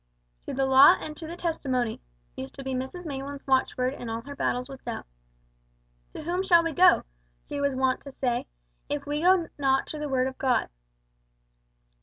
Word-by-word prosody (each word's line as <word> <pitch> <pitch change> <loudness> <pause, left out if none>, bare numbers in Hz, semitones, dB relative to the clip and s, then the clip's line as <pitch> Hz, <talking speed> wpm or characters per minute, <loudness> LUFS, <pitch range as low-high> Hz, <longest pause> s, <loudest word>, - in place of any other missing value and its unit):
"To - - -3
the 270 0 +1
law 265 +1 +8
and 305 - -7
to 320 - -7
the 340 +2 -7
testimony" 260 -9 -1 0.3
used 130 - -7
to 275 - -8
be 265 0 -3
Mrs 265 +8 -4
Maylands' 280 -1 -6
watchword 260 -1 +1
in 245 -4 -7
all 225 0 -3
her 285 +4 -9
battles 250 -2 -1
with 270 -1 -11
Doubt. 235 -2 -5 1.1
"To - - -6
whom 350 +3 -1
shall 345 -3 +5
we 330 - -1
go," 360 +4 +5 0.4
she 285 - -4
was 280 -1 +1
wont 260 0 +1
to 275 - -10
say, 245 -2 -1 0.4
"if 290 -1 -2
we 295 +1 -2
go 360 -1 +4
not 270 -1 +2
to 305 - -5
the 300 -1 -3
Word 260 -1 +2
of 260 0 -5
God?" 255 -3 +1
275 Hz, 190 wpm, -27 LUFS, 260-305 Hz, 1.1 s, law